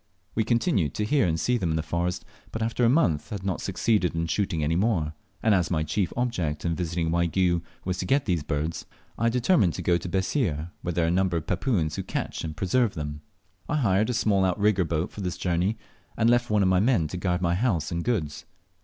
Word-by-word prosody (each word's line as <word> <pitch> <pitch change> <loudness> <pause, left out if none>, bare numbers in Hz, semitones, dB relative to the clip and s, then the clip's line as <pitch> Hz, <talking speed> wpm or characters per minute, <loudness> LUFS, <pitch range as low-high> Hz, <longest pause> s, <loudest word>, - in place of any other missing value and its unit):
We 110 - +1
continued 115 - +1
to 105 - -1
hear 135 -3 +2
and 80 -1 0
see 120 +9 +1
them 90 - -1
in 80 - 0
the 80 - -1
forest, 85 +2 -2 0.3
but 110 - -3
after 115 +2 0
a 115 - +5
month 80 - +2
had 100 -3 -5
not 95 -2 -1
succeeded 95 -2 +1
in 80 0 0
shooting 85 -2 -1
any 80 +2 +1
more; 90 -6 +1 0.3
and 110 - +4
as 90 -3 +2
my 80 -3 0
chief 90 +4 -1
object 90 -12 -1
in 85 - +1
visiting 85 -1 -1
Waigiou 85 +1 +2 0.2
was 90 0 -2
to 90 - -3
get 135 +6 +2
these 90 -6 0
birds, 75 +2 -3 0.3
I 115 +1 +3
determined 120 - +3
to - - -5
go 85 -1 +3
to 85 +1 -6
Bessir, 90 - -1
where 90 - -2
there 85 0 +1
are - - +1
a - - +1
number 90 -1 +1
of 80 - -4
Papuans 90 - 0
who - - -1
catch - - -4
and 80 -1 -5
preserve 105 +2 +1
them. 75 -1 -5 0.5
I - - +1
hired 110 -6 +2
a - - 0
small 100 -4 +2
outrigger 95 0 +2
boat 80 +1 -2
for 105 - -8
this 90 -2 -3
journey, 90 +4 0 0.4
and 115 +1 +4
left 120 0 +2
one 105 -2 +3
of - - +3
my 95 -1 +4
men 105 -7 +2
to 90 - -5
guard 90 0 -1
my 85 0 +2
house 90 - 0
and 85 0 -2
goods. 80 -10 -2
90 Hz, 235 wpm, -26 LUFS, 85-110 Hz, 0.5 s, a